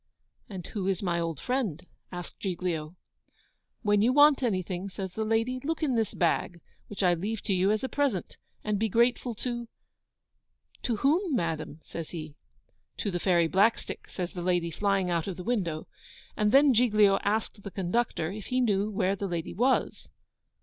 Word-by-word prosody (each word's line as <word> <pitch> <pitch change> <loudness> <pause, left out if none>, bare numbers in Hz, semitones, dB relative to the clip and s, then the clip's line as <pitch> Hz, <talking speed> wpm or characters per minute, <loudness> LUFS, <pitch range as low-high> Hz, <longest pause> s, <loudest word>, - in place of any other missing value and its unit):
'And 185 -4 -7
who 195 -3 -4
is 195 0 0
my 170 -2 0
old 165 -4 -2
friend?' 225 - -2 0.3
asked 175 -1 -7
Giglio. 175 -4 -3 0.9
'When 205 -1 +3
you 235 +4 +4
want 290 +1 +6
anything,' 185 -4 -1
says 190 -1 -6
the 220 - -2
lady, 225 +4 0
'look 320 +2 -2
in 280 -4 +2
this 225 -3 0
bag, 170 0 0 0.3
which 205 -1 -4
I 180 -1 +5
leave 200 +5 -3
to 200 - 0
you 185 +1 +2
as 215 +3 +1
a - - 0
present, 265 -10 -1 0.3
and 210 -1 0
be 220 +1 +1
grateful 235 +2 +2
to 240 +1 -4 0.5
' - - -36
'To 240 - 0
whom, 305 - +2
madam?' 160 -4 -2
says 165 -2 -7
he. 155 -3 -7 0.6
'To 205 - -2
the 175 - -2
Fairy 170 -2 +3
Blackstick,' 200 +7 +1
says 180 -1 -4
the 180 - -5
lady, 175 -1 +1
flying 195 0 +1
out 170 0 0
of 190 - -4
the 180 - -6
window. 175 -9 -1 0.5
And 210 0 +2
then 275 +1 +6
Giglio 210 -4 +4
asked 210 0 -1
the 200 - -6
conductor 190 -2 -1
if 205 0 -7
he 255 - 0
knew 210 -4 +2
where 195 -1 0
the 200 0 -3
lady 170 -3 -3
was? 255 +5 +1
200 Hz, 180 wpm, -28 LUFS, 175-230 Hz, 0.9 s, want